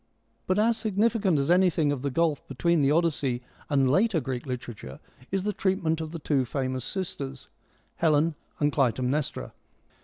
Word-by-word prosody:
But 185 - +2
as 225 +2 +3
significant 215 -4 +1
as 140 +3 +1
anything 175 -5 +3
of 140 -3 -2
the 140 - -1
gulf 155 +1 0
between 170 +4 +1
the 135 - +3
Odyssey 145 -6 +1 0.3
and 135 -3 +3
later 190 - +3
Greek 130 -2 -4
literature 120 - -6 0.3
is 195 -1 -1
the 210 +1 -1
treat 190 -1 0
ment 160 0 +1
of 160 - -4
the 165 - -5
two 145 -4 +1
famous 130 0 -2
sisters, 140 -8 -5 0.5
Helen 160 0 +3 0.3
and 145 0 +2
Clytemnestra. 130 +1 0
150 Hz, 160 wpm, -27 LUFS, 135-185 Hz, 0.5 s, as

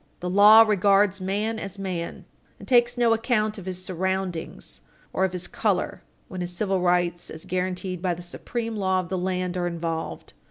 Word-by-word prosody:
The 180 0 -3
law 210 +3 +9
regards 200 -2 +3
man 210 +4 -1
as 195 -1 -7
man, 180 -4 -5 0.3
and - - -12
takes 240 -1 +3
no 235 -2 +4
account 220 -2 0
of 190 - -10
his 185 0 -5
surroundings 185 - -3 0.3
or 190 - +2
of 190 - -2
his 180 -1 -4
color - - -1 0.3
when 185 -1 -6
his 175 0 -3
civil 190 +1 -1
rights 175 -1 +1
as 160 - -8
guaranteed 180 0 -3
by 180 -2 0
the 175 - -9
supreme 230 +5 -5
law 190 -2 +1
of 180 -2 -5
the 190 - -1
land 180 0 -2
are 175 -1 0
involved. 165 -1 -4
185 Hz, 185 wpm, -25 LUFS, 180-205 Hz, 0.3 s, law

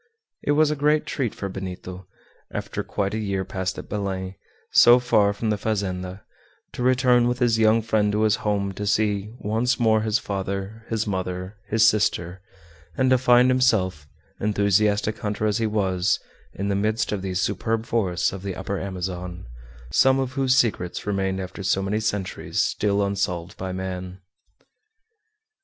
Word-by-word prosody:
It 145 - +1
was 150 0 +4
a - - 0
great 150 +1 +2
treat 125 -7 -2
for 100 - -4
Benito, 95 -1 -7 0.4
after - - -4
quite 100 0 -2
a 110 - -1
year 100 -3 -2
passed 95 0 -3
at - - -7
Belem, 95 -2 -3 0.4
so 120 +1 +8
far 110 -5 +3
from 110 +2 -2
the 105 - -1
fazenda, 95 -3 -3 0.5
to - - -6
return 125 -1 +4
with 125 0 0
his 120 -3 +2
young 110 +1 +4
friend 105 -2 +1
to 105 +1 +1
his 110 0 +3
home 100 -2 -1
to 100 +2 -5
see 105 +1 0
once 115 +4 0
more 110 -2 +3
his 110 0 +1
father, 100 +2 -4
his 110 -1 -1
mother, 95 0 -4
his 110 +1 +4
sister, 95 -4 +1 0.6
and 130 -1 +2
to 130 - +5
find 125 0 +5
himself, 95 - +1 0.3
enthusiastic 105 +1 +1
hunter 105 -1 -2
as 105 0 +1
he 115 - +1
was, 95 -4 +1 0.4
in 100 +1 -2
the 100 - +1
midst 110 +3 0
of 105 -2 -2
these 95 -1 -2
superb 110 +4 -1
forests 95 -8 0
of 95 - -6
the 95 -2 -4
Upper 95 +1 -3
Amazon, 90 -1 -5 0.5
some 135 - +5
of 130 -1 -1
whose 130 -1 +2
secrets 95 -8 0
remained 95 -2 -1
after 95 +2 -6
so 95 0 +1
many 105 +3 0
centuries 100 -4 -3
still 100 -1 +1
unsolved 90 -3 -2
by 95 0 -5
man. 95 0 -5
100 Hz, 165 wpm, -24 LUFS, 95-110 Hz, 0.6 s, so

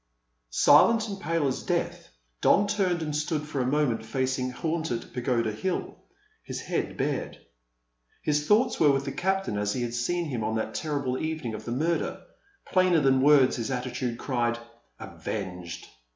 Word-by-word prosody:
Silent 220 - +5
and 200 -2 -5
pale 165 -6 0
as 130 - -2
death, - - -2 0.3
Don 205 - +5
turned 185 -5 0
and 150 -1 -3
stood 150 0 -1
for 140 -3 -2
a 125 - 0
moment 135 -5 +1
facing 130 +2 -1
Haunted 160 -3 -3
Pagoda 120 -2 0
Hill, 180 - -3 0.5
with - - -4
head - - -3
bared. - - -2 0.9
His 150 0 0
thoughts 225 +7 +3
were 150 -3 +6
with 135 0 0
the 135 - -3
captain 190 - -1
as 105 0 0
he 125 - -2
had 120 -1 -3
seen 170 +9 -1
him 125 -8 -3
on 110 +1 -1
that 110 0 -2
terrible 140 -4 -2
evening 155 -7 -3
of 110 0 -7
the 120 - -4
murder. 160 +7 -1 0.5
Plainer 185 -3 +3
than 135 -1 +4
words 140 -2 +5
his 115 0 -3
attitude 125 -1 -3
cried: 120 -2 0 0.4
"Avenged!" 90 -4 -6
135 Hz, 165 wpm, -27 LUFS, 120-160 Hz, 0.9 s, were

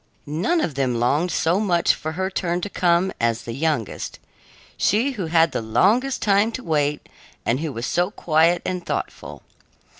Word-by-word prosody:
None 175 - 0
of 160 - -1
them 130 -3 0
longed 145 +9 +1
so 165 +3 +1
much 180 -5 +2
for 155 +1 -5
her 190 +3 -2
turn 175 -2 -1
to 205 - -4
come 175 +1 +2
as 115 0 0
the 115 - -6
youngest 145 -5 -2 0.6
she 230 +8 +2
who 200 -10 -4
had 165 0 +3
the - - -2
longest 220 - +2
time 205 +2 +3
to 255 - -5
wait 150 -2 0 0.4
and 120 +3 +1
who 160 -1 -3
was 115 -1 -4
so 175 +1 +1
quiet 170 -3 +2
and 180 -1 -3
thoughtful. - - -5
170 Hz, 175 wpm, -22 LUFS, 145-190 Hz, 0.6 s, had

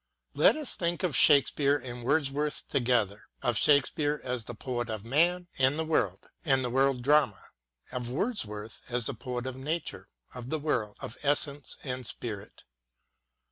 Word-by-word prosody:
Let - - +5
us 305 -4 0
think 175 +1 -1
of 175 -6 +1
Shakespeare 145 -1 +5
and 125 -2 -7
Wordsworth 145 +2 0
together 115 -5 0
— - - -43
of 120 - +1
Shake 140 +3 +5
speare 150 0 -1
as 125 -3 -2
the 120 - -7
poet 120 0 -3
of 110 -1 -5
man 175 +8 +2
and 135 +4 +3
of 160 - 0 0.7
the 130 -2 -1
world 135 -1 +2
drama; 140 -8 +2 0.4
of 125 -1 -4
Wordsworth 115 - -3
as 125 -1 -1
the 140 - -1
poet 125 +1 -5
of 130 -1 -4
Nature, 150 +5 -4 0.2
of 125 0 -8
the 155 - 0
world, 125 -9 -1
of 115 - -7
essence 145 0 0
and 130 -3 -4
spirit. 105 -4 -7
130 Hz, 160 wpm, -29 LUFS, 120-150 Hz, 0.7 s, Let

